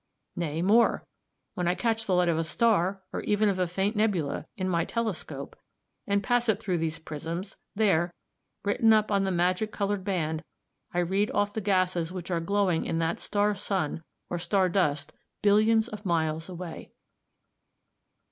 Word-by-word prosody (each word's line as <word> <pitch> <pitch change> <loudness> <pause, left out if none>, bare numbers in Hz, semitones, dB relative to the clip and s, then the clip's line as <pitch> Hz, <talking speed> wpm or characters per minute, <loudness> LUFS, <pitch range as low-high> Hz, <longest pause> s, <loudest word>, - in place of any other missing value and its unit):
Nay, 165 -1 -2
more; 225 +5 +4 0.5
when 180 - -2
I 175 - +2
catch 225 0 -1
the 185 - +2
light 180 0 +3
of 165 -1 +2
a - - +1
star, 195 0 +1
or - - -2
even 210 0 +2
of 190 -2 -1
a 180 - +2
faint 195 +5 -1
nebula, 180 -10 0
in 185 -1 -1
my 170 -2 +1
telescope, 225 -4 -4 0.5
and 200 0 +1
pass 245 +2 +1
it 220 - +2
through 180 -3 -1
these 165 0 -1
prisms, 165 +6 -6 0.2
there, 185 -5 +2 0.5
written 220 +2 +4
up 215 -1 +2
on 200 -1 +2
the 190 - 0
magic 180 +4 +1
coloured 200 -1 -1
band, 165 -5 -1 0.5
I 175 - +1
read 195 +4 +1
off 205 0 +1
the 220 - -2
gases 185 -4 +1
which 185 -1 -6
are 170 - +1
glowing 185 -1 +1
in 165 - -2
that 165 0 0
star 205 0 +1
sun 190 -5 -2 0.2
or 175 - -3
star 185 +2 +2
dust 150 -5 0 0.3
billions 215 +2 +4
of 215 -3 -8
miles 160 -2 0
away. 175 -2 -7
185 Hz, 170 wpm, -28 LUFS, 170-205 Hz, 0.5 s, more